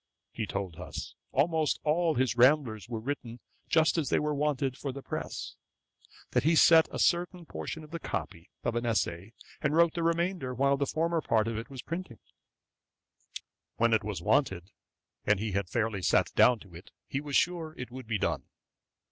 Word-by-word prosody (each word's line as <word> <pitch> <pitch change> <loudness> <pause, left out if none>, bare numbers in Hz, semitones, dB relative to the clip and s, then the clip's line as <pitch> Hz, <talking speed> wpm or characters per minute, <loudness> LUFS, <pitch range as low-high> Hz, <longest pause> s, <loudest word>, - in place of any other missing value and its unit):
He 110 -2 -4
told 95 -5 -4
us, 90 - -7 0.2
'almost 155 +1 +1
all 160 +1 +2
his 125 -2 +1
Ramblers 120 -5 +3
were 115 -2 -3
written 120 -1 -5 0.3
just 160 +1 +3
as 150 - -1
they - - +3
were 150 0 0
wanted 140 -3 0
for 140 0 -4
the 135 +1 -8
press; - - -5 0.8
that - - +3
he 160 +3 +3
sent 160 0 +7
a - - -4
certain 175 0 +1
portion 160 0 -6
of 150 - -14
the 170 - -4
copy 90 - -5
of 120 - 0
an 120 - 0
essay, 110 -3 -1 0.3
and 150 0 +1
wrote 170 0 +5
the 170 - -2
remainder, 170 -5 0
while 140 +2 +3
the 140 0 -1
former 165 +1 0
part 110 -5 +1
of 115 - -2
it 115 +5 -5
was 135 -3 -8
printing. 165 -9 -5 1.6
When 115 0 +2
it 110 -1 +3
was 100 -5 -4
wanted, 95 -9 +1 0.5
and 105 -2 +2
he 110 0 -2
had 100 -1 -1
fairly 115 -4 -1
sat - - +2
down 125 - +5
to 95 -4 -15
it, 85 +4 -12 0.2
he 140 - -2
was 145 -2 -4
sure 165 -3 +1
it 125 -2 -7
would 130 -2 -9
be 110 -1 0
done.' - - -1
130 Hz, 190 wpm, -30 LUFS, 110-160 Hz, 1.6 s, sent